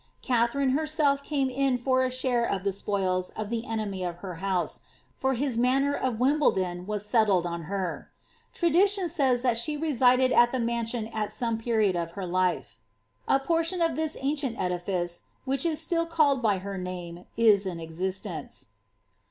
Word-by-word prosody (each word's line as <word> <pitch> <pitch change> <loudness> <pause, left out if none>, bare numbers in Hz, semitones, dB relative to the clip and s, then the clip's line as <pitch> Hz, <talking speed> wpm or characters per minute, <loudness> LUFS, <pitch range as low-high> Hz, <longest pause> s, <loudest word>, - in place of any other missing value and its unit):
Katha 280 +4 +1
came 280 -2 0
in 270 0 +1
for 260 +1 +1
a 255 - +1
share 255 -2 0
of 195 -5 -1
the 200 - +1
spoils 190 -2 -1
of 215 0 -4
the 235 +1 -2
enemy 210 -4 -3
of 175 -1 -3
her 180 -3 -6
house, 190 -3 -1 0.4
lor 265 0 +3
of 260 0 +1
Wimbledon 190 -10 +1
was 210 -1 -3
settled 210 -6 +3
on 170 -1 -4
her. 190 -2 -4 0.4
Tradition 370 +3 +2
says 270 -7 +1
that 245 -3 +2
at 255 -4 +3
the 260 - -1
maru«ion 235 -1 -1
at 215 -1 -2
some 230 -3 -2
period 220 -5 +1
of 170 -1 -3
her 195 -1 -5
life. 175 - -1 0.5
A 270 - +4
portion 330 +5 0
of 330 -1 +1
this 315 0 -2
ice, 185 - -1 0.2
which 270 +4 0
is 315 -2 -1
still 335 +1 0
called 300 -5 +2
by 210 -4 +2
her 195 +1 -5
name, 180 -1 -7
is 210 -4 +4
in 175 -2 -4
existence.' 180 +4 -5
235 Hz, 150 wpm, -27 LUFS, 190-275 Hz, 0.5 s, A